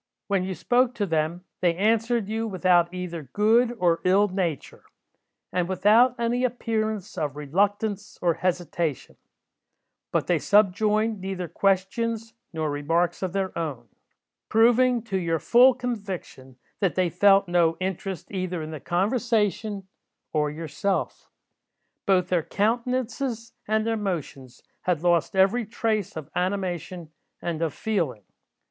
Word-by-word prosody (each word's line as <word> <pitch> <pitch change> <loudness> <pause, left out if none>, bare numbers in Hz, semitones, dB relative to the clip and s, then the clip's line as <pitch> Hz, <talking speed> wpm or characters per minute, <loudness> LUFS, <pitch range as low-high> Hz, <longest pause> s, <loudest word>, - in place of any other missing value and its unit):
When 195 -2 0
you 190 0 -3
spoke 250 +4 +2
to 210 - 0
them, 165 0 -1 0.2
they 175 -2 +2
answered 225 +2 +1
you 225 +1 -2
without 180 -3 +3
either 180 -2 -5
good 230 +3 +3
or 170 -4 +2
ill 195 +3 +4
nature, 180 -7 -3 0.7
and 180 -1 0
without 215 +7 +4
any 240 +2 0
appearance 220 -4 -2
of 145 -2 -2
reluctance 200 +7 -1
or 175 -2 +2
hesitation; 175 -4 -2 1.0
but - - +1
they 175 -3 +1
subjoined 210 +3 +2
neither 190 -2 -4
questions 215 +6 0 0.2
nor 160 -3 -2
remarks 165 +5 0
of 185 -2 -2
their 195 -1 -2
own; 140 -9 -4 0.6
proving 240 +1 +4
to 195 -5 -2
your 165 -2 0
full 245 - +5
conviction 195 - -6 0.2
that 195 -4 +1
they 180 -2 +1
felt 195 +1 +5
no 170 -2 +2
interest 190 0 -4
either 185 -4 -3
in 155 - -7
the 155 - -6
conversation 210 - 0 0.5
or 150 -1 +1
yourself. 165 +5 -3 0.8
Both 185 -2 +3
their 180 -2 +2
countenances 235 - -2
and 215 +1 +1
their 225 0 0
motions 150 - -5 0.2
had 175 -3 -1
lost 175 +1 +2
every 195 +4 +3
trace 215 -4 -2
of 155 -3 -8
animation 180 -3 -3 0.3
and 170 -2 -3
of 165 -3 -1
feeling. 165 - -2
190 Hz, 130 wpm, -25 LUFS, 170-220 Hz, 1.0 s, full